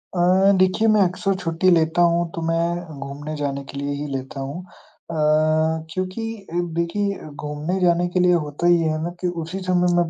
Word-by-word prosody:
अ, - - -1 0.4
देखिए 185 +4 +3
मैं 210 - +4
अक्सर 190 +1 +1
छुट्टी 170 +1 +1
लेता 165 0 +3
हूँ 170 0 0
तो 165 - -4
मैं 165 -2 -1
घूमने 145 +3 -6
जाने 140 -1 -3
के 140 - -7
लिए 140 0 -2
ही 150 - -3
लेता 135 +1 -5
हूँ। 135 +3 -5
अ, 170 - -13 0.8
क्योंकि 185 +4 -3 0.6
देखिए 200 +2 -2
घूमने 150 +5 -3
जाने 175 0 +3
के 180 - 0
लिए 180 0 +4
होता 155 0 -1
ये 170 -2 +4
है 155 0 -2
ना 170 - -2
कि 180 - 0 0.2
उसी 175 +4 -5
समय 180 -1 +3
मैं 175 -1 +2
170 Hz, 185 wpm, -22 LUFS, 150-180 Hz, 0.8 s, मैं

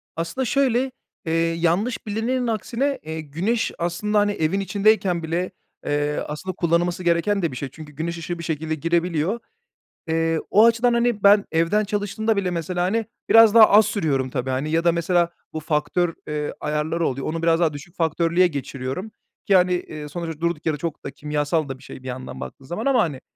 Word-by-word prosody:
Aslında 170 +11 -2
şöyle, 260 0 +1 0.3
eee, 160 - -1 0.2
yanlış 175 +9 0
bilinenin 240 +4 -1
aksine, 240 +5 -1
eee, 160 0 -5
güneş 180 +11 -1
aslında, 180 +5 0
hani, 205 0 +2
evin 185 0 0
içindeyken 195 -3 +2
bile, 170 +4 -2 0.3
eee, 145 0 0
aslında 175 +5 -5
kullanılması 175 +1 0
gereken 175 +4 +2
de 170 - 0
bir 125 - -7
şey. 140 - -4
Çünkü 150 0 -11
güneş 170 +4 -4
ışığı 170 +1 -5
bir 170 - -6
şekilde 160 0 -2
girebiliyor. 170 +5 0 0.7
Eee, 165 0 +1
o 215 +3 +6
açıdan, 235 +1 +3
hani, 235 -3 +1
ben 200 0 +6
evden 165 +6 +2
çalıştığımda 205 +2 -1
bile 190 -3 0
mesela, 175 +1 -2
hani, 220 +4 0 0.2
biraz 225 -2 +8
daha 220 -2 +9
az 210 +1 +7
sürüyorum 140 -9 0
tabii, 130 0 -3
hani, 130 +4 -1
ya 165 +1 +2
da 170 - +4
mesela 170 +1 +1 0.2
bu 160 - -3
faktör, 155 +3 0
eee, 150 -1 -3
ayarları 150 +2 -1
oluyor, 135 +1 -3
onu 165 +1 -3
biraz 165 0 +3
daha 165 -3 +2
düşük 145 +5 -10
faktörlüye 170 +2 +2
geçiriyorum 140 - -5 0.4
ki, 195 - +5
hani, 180 0 +4
eee, 155 -4 -5
sonuçta 165 -1 -6
durduk 170 -2 -1
yere 155 -2 0
çok 165 0 -5
da 140 - -4
kimyasal 150 +1 -1
da 135 - -5
bir - - -19
şey 130 - -11
bir - - -8
yandan 130 0 -6
baktığın 135 - -9
zaman 175 - -4
ama, 270 -4 +4
hani, 140 -5 -4
170 Hz, 190 wpm, -23 LUFS, 155-205 Hz, 0.7 s, daha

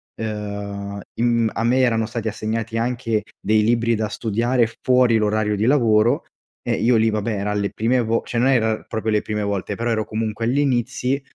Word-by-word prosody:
ehm, 100 -2 -5 0.2
im 115 -1 +2
a 115 - -2
me 125 +2 +3
erano 115 -3 +2
stati 115 0 -4
assegnati 110 +1 -3
anche 115 -2 -1 0.2
dei 110 +1 +2
libri 115 0 +2
da 110 0 -1
studiare 115 +2 0
fuori 125 -2 +4
l'orario 105 0 +1
di 105 - 0
lavoro, 115 -4 +3 0.4
e - - 0
io 120 +1 +2
lì, 110 0 +3
vabbè, 110 +1 -1
eran 105 +1 -1
le 100 0 -1
prime 120 +3 +1
vo 115 0 0
cioè 120 - -4
non 125 - +3
erano 110 -4 +2
proprio 110 0 -2
le 105 -1 +2
prime 105 -1 -3
volte, 100 0 -2
però 115 +3 -2
ero 110 -1 0
comunque 110 +1 -3
agli 125 +5 +1
inizi 130 0 0
110 Hz, 190 wpm, -21 LUFS, 105-120 Hz, 0.4 s, fuori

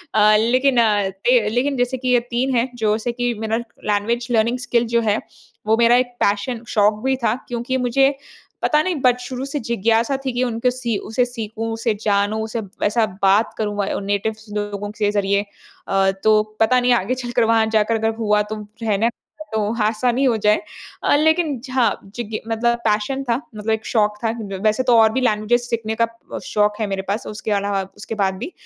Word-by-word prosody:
अ, 215 0 +6
लेकिन 255 +4 +2
अ, 205 -3 +2
थे 210 +3 +2
लेकिन 260 +5 0
जैसे 245 +1 0
कि 255 0 -3
ये 245 -1 +5
3 255 +2 0
है 240 +2 +1
जैसे 220 +1 0
कि 245 0 -1
मेरा 220 0 -1
लैंग्वेज 230 0 -2
लर्निंग 230 +2 +2
स्किल 240 -1 +1
जो 235 - +4
है, 215 -1 +1 0.5
वो 220 - +4
मेरा 235 +1 +5
एक 245 -1 -1
पैशन 225 +4 0
शौक 210 +1 +2
भी 265 - +2
था 225 +1 +2
क्योंकि 245 +2 -2
मुझे, 270 +3 +2 0.5
पता 300 0 +3
नहीं 370 -2 -1
बच 250 -1 +3
शुरू 255 +1 -5
से 280 +1 -3
जिज्ञासा 230 +2 +1
थी 260 - 0
कि 250 +1 0
उनको 240 0 0
सी 240 -4 -2
उसे 245 +3 +2
सीखूँ, 225 -2 -5
उसे 225 0 0
जानूँ, 205 +1 +1
उसे 220 +1 -3 0.2
ऐसा 220 +2 +2 0.2
बात 200 +4 +3
करूँ 210 -1 -2
व 200 - 0 0.2
नेटिव 205 +2 -1 0.2
लोगों 205 0 -4
के 205 -1 +2
ज़रिए। 200 0 +1 0.4
अ, 195 0 +2
तो 215 -1 +5 0.2
पता 250 +3 +4
नहीं 245 0 +3
आगे 240 +3 0
चलकर, 245 -2 -1
वहाँ 225 0 +3
जाकर 220 +1 +2
अगर 225 0 0
हुआ, 210 -1 +2
तो 210 +1 -4 0.3
रहना 220 +1 +2 0.4
तो 220 - +1 0.2
आसानी 240 +4 +1
हो 245 -3 +3
जाए। 210 0 +4 0.4
अ, - - +4
लेकिन 315 -2 +2
झ 255 -2 +1 0.3
जिज्ञ 225 -3 -4
मतलब 235 +1 +1
पैशन 215 +6 0
था 235 -3 0 0.2
मतलब 210 +1 -5
एक 220 -1 -1
शौक़ 210 -2 +1
था 225 - +1
अ, 210 -4 -5
वैसे 215 +4 +2
तो 245 -2 +4
और 220 0 +5
भी 260 - 0
लैंग्वेजेस 240 +1 +1
सीखने 220 -1 -2
का 230 - +3 0.3
अ, - - -3
शौक़ 210 +1 0
है 210 - 0
मेरे 195 -1 -2
पास, 210 +2 -2
उसके 215 +1 -5
अलावा 200 -1 0 0.2
उसके 220 +2 -6
बाद 190 0 +1
भी। 330 - -6
225 Hz, 200 wpm, -20 LUFS, 210-245 Hz, 0.5 s, अ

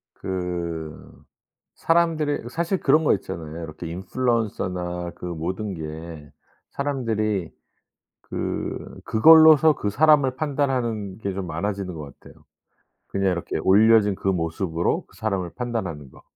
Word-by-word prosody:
그 85 -4 -5 0.5
사람들이 165 -4 +1
이 120 - -6
사실 170 +6 -1
그런 155 +3 +3
거 - - +4
있잖아요. 85 -3 -6
이렇게 80 +2 -8
인플루언서나 90 -3 -2
그 - - -12
모든 90 +4 -4
게 80 -1 -8 0.4
사람들이 110 - -1 0.7
그 - - -5
그걸로써 155 +4 +7
그 105 - -2
사람을 140 0 +4
판단하는 125 -9 -1
게 100 -3 -3
좀 95 -2 -4
많아지는 100 0 -3
것 75 -3 -9
같아요. - - -17 0.6
그냥 95 -1 0
이렇게 85 -1 -3
올려진 105 +1 +5
그 95 - -3
모습으로 85 -1 -1
그 - - -22
사람을 95 -5 -2
판단하는 95 - -4
거. - - -18
100 Hz, 285 characters per minute, -24 LUFS, 85-130 Hz, 0.7 s, 그걸로써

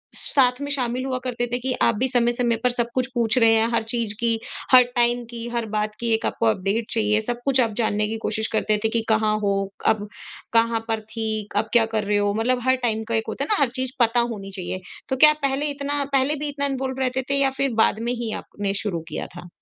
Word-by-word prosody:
साथ 250 -2 +3
में 285 - -4
शामिल 255 -1 -1
हुआ 255 -1 -2
करते 245 -1 -2
थे? - - +2
कि 255 +1 -1
आप 230 - +3
भी 255 +5 +1
समय-समय 240 -1 +1
पर 250 - +4
सब 240 -1 -1
कुछ 255 -1 +1
पूछ 235 0 +1
रहे 225 -2 +6
हैं, 225 0 +4
हर 230 - +2
चीज़ 225 -1 -1
की, 230 -1 +1 0.3
हर 255 -1 +9
टाइम 240 0 +2
की, 235 0 -4
हर 235 - -1
बात 210 0 -1
की, 235 -1 +1
एक 220 - 0
आपको 230 - -1
अपडेट 215 +2 0
चाहिए, 215 -1 +2
सब 240 +2 -4
कुछ 265 -2 +3
आप 225 -3 0
जानने 210 -2 0
की 225 +1 -3
कोशिश 220 +1 0
करते 215 -1 +1
थे 220 - +2
कि 230 +1 0
कहाँ 215 -1 +2
हो? 200 -1 0 0.3
अब 210 -1 +1 0.5
कहाँ 230 0 +3
पर 225 -1 -1
थी? 220 -1 -4
अब 220 +2 0
क्या 230 -2 +5
कर 215 - +1
रहे 205 0 +1
हो? 205 0 +1
मतलब 240 +4 0
हर 260 - +5
टाइम 220 0 -1
का 230 - 0
एक 220 0 -1
होता 275 - -3
है - - -4
ना 415 -9 +2
हर 275 - +4
चीज़ 260 -1 -1
पता 235 0 +3
होनी 195 -2 -8
चाहिए। 185 0 -4 0.3
तो 265 - 0
क्या 305 +2 +8
आप 305 - -6
पहले 275 +2 0
इतना 285 0 -1
पहले 275 +3 +2
भी 295 0 -1
इतना 280 0 -2
इन्वॉल्व 265 -1 -3
रहते 260 0 0
थे? 280 - +2
या 270 - +4
फिर 275 0 +2
बाद 215 - +1
में - - +2
ही 235 -2 -3
आपने 200 -1 -4
शुरू 185 -6 -2
किया 155 - -4
था? 175 - -9
235 Hz, 250 wpm, -23 LUFS, 220-255 Hz, 0.5 s, हर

